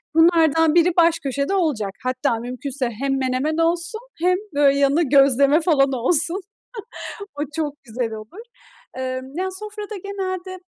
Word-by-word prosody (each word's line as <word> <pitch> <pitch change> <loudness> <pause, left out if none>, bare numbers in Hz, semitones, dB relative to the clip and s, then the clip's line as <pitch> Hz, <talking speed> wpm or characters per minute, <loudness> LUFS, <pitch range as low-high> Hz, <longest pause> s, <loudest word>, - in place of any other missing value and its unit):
Bunlardan 325 -1 +4
biri 345 +1 +4
baş 335 -1 +4
köşede 280 +4 -2
olacak. 280 - 0
Hatta 255 -1 0
mümkünse 255 +2 -3
hem 270 +4 -2
menemen 265 +4 -1
olsun 335 +6 0 0.2
hem 365 +2 +2 0.2
böyle 280 -1 +3
yanına 280 +4 +3
gözleme 280 +1 +4
falan 280 -5 +3
olsun. 335 - 0 0.9
O 290 - -4
çok 295 -2 -3
güzel 230 -1 -3
olur. 220 - -9 0.6
Imm, 260 0 -4
yani 375 +1 -2
sofrada 420 +1 -7
genelde, 375 -2 -4
290 Hz, 135 wpm, -21 LUFS, 260-345 Hz, 0.9 s, Bunlardan